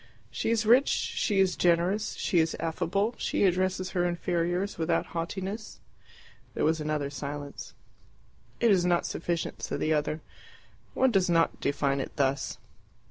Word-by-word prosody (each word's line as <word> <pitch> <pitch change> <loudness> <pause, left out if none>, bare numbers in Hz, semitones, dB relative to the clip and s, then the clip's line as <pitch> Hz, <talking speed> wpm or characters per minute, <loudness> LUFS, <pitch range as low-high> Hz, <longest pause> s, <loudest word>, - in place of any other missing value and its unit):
"She - - -2
is 225 -1 +1
rich, 245 +5 +6
she 205 -3 0
is 190 -2 +3
generous, 180 +5 +2
she 175 - +1
is 160 0 +1
affable, 175 +7 0
she - - 0
addresses 185 0 +1
her 180 -2 +1
inferiors 175 +2 -1
without 160 +1 +1
haughtiness." 190 +6 -4 0.8
There - - +1
was 160 0 +1
another 150 -2 -2
silence. 145 0 -6 0.8
"It 235 -2 +4
is 185 -3 +4
not 175 -1 +2
sufficient," 170 0 -3
said - - -3
the 155 - +1
other. 150 +1 -1 0.7
"One 260 -1 +3
does 190 -4 +2
not 165 -1 +2
define 140 -1 0
it 135 - -5
thus." 135 -1 0
175 Hz, 145 wpm, -28 LUFS, 160-195 Hz, 0.8 s, rich